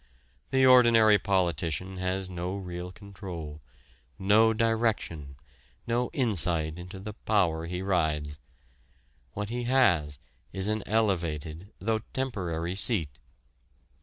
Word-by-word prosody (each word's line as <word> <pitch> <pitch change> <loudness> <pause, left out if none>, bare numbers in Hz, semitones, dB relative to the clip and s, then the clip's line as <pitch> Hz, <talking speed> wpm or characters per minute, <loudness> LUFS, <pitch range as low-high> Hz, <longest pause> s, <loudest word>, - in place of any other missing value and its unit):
The 130 0 +3
ordinary 115 -4 +6
politician 90 -1 -1
has 95 +1 -2
no 90 +1 -4
real 90 -1 -6
control, 90 -7 -9 0.6
no 105 +4 +4
direction, 110 - -1 0.5
no 120 +1 0
insight 85 - 0
into 90 +2 -9
the 105 +2 -7
power 85 -7 0
he 90 +2 -4
rides. 75 -6 -1 0.9
What 105 0 -4
he 120 +1 -3
has 90 - +2 0.3
is 95 +1 -3
an 110 0 0
elevated, 85 -4 -1
though 110 +3 -1
temporary 90 -10 -2
seat. 95 - +3
95 Hz, 105 wpm, -28 LUFS, 85-110 Hz, 0.9 s, ordinary